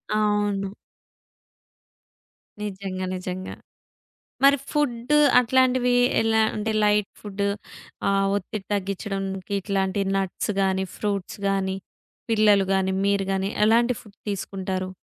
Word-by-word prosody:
అవును. 205 -2 +1 1.9
నిజంగా, 190 -2 -4
నిజంగా. 185 0 -5 0.9
మరి 280 +1 +7 0.2
ఫుడ్డు 290 -1 +1 0.2
అట్లాంటివి 250 0 +3 0.3
ఎలా 220 0 +3
అంటే, 220 +1 -1
లైట్ 210 -1 +3
ఫుడ్డు, 200 -1 -2 0.6
ఆహ్, 195 0 +2
ఒత్తిడి 205 +1 -5
తగ్గించడానికి, 195 0 -3
ఇట్లాంటి 195 0 -1 0.2
నట్స్ 195 +1 -2
గానీ, 190 0 +1
ఫ్రూట్స్ 200 -3 -3
గానీ, 190 -1 0 0.5
పిల్లలు 210 -3 +4
గానీ, 190 0 +1
మీరు 200 -1 +1
గాని, 195 +1 -1 0.2
ఎలాంటి 235 +2 +3
ఫుడ్ 210 0 -18
తీసుకుంటారు? 190 -1 -3
200 Hz, 100 wpm, -24 LUFS, 190-215 Hz, 1.9 s, మరి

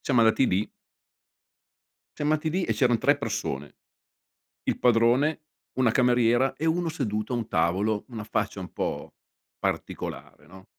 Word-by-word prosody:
Siamo 125 -4 +2
andati 115 +3 +4
lì. 95 +4 0 1.5
Siam 150 +1 +1
andati 155 +1 0
lì 180 +3 0
e - - 0
c'eran 120 -4 +2
3 - - +3
persone: 70 +2 -4 0.9
il - - -1
padrone, 125 +6 +3 0.4
una 125 -3 +4
cameriera 125 +1 +3
e 160 - -3
uno 170 +1 +1
seduto 110 -7 -3
a - - +1
un 115 -2 -3
tavolo, 95 +6 +1
una 115 -4 -6
faccia 105 -2 -2
un 90 -3 -8
po' - - -4 0.4
particolare, 75 - -4
no. 95 +3 -14
120 Hz, 145 wpm, -26 LUFS, 105-135 Hz, 1.5 s, andati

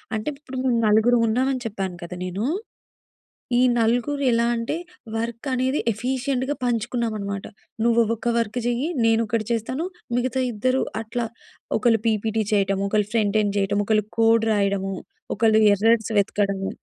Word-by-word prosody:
అంటే 215 +5 -2
ఇప్పుడు 265 -3 -8
మేము 255 -2 +2
నలుగురుం 225 +3 +4
ఉన్నామని 255 +3 +1
చెప్పాను 195 -4 -4
కదా! 175 +1 -7
నేను. 185 +4 -3 1.1
ఈ - - +4 0.2
నలుగురు 245 +5 +1
ఎలా 235 0 +2
అంటే 230 +5 -2 0.4
వర్క్ 230 +3 -4
అనేది 260 +2 +1
ఎఫిషియంట్‌గా 260 +4 -1
పంచుకున్నామనమాట. 225 -4 -2 0.4
నువ్వు 235 0 +4
ఒక్క 235 +1 -1
వర్క్ 230 +1 -2
చెయ్యి, 245 +6 0 0.2
నేనొకటి 225 -1 +1
చేస్తాను. 245 +7 -1 0.3
మిగతా 255 +1 0
ఇద్దరు 255 +5 +1 0.2
అట్లా, 230 +2 -3 0.5
ఒకళ్ళు 230 -3 +2
పీపీటీ 220 0 +1
చేయటము, 195 -1 +1
ఒకళ్ళు 210 0 +1
ఫ్రంట్ 215 -2 +2
ఎండ్ 205 -1 -1
చేయటము, 200 +1 +1
ఒకళ్ళు 215 -2 +2
కోడ్ 225 0 +4
రాయడము, 200 -2 0 0.4
ఒకళ్ళు 220 0 +4
ఎర్రర్స్ 225 +2 +2
వెతకడము. 200 -1 0
225 Hz, 135 wpm, -23 LUFS, 205-245 Hz, 1.1 s, నలుగురుం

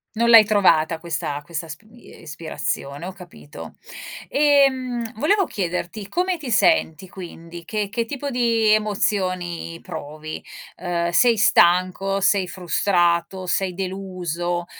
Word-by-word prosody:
Non 235 +1 +2
l'hai 230 -2 +10
trovata 175 -6 +2
questa 160 -3 -4
questa 165 +2 -6
sp 155 - -11
ie 240 +1 -16
ispirazione, 155 -1 -5
ho 190 - -6
capito. 175 -5 -12 0.5
Ehm, 260 -5 +2
volevo 380 - +2
chiederti 185 - -4
come 365 - 0
ti 280 -6 -6
senti 195 - +2
quindi, 170 -2 -10
che 210 +3 -3
che 230 +3 -2
tipo 280 +4 -5
di 230 -4 +2
emozioni 185 -5 -1
provi? 155 -2 -8 0.4
Uhm, 175 -1 -1
sei 235 +4 +4
stanco, 185 +1 +3
sei 195 0 +2
frustrato, 175 0 0
sei 185 +1 0
deluso? 175 -2 -4
185 Hz, 120 wpm, -22 LUFS, 170-225 Hz, 0.5 s, l'hai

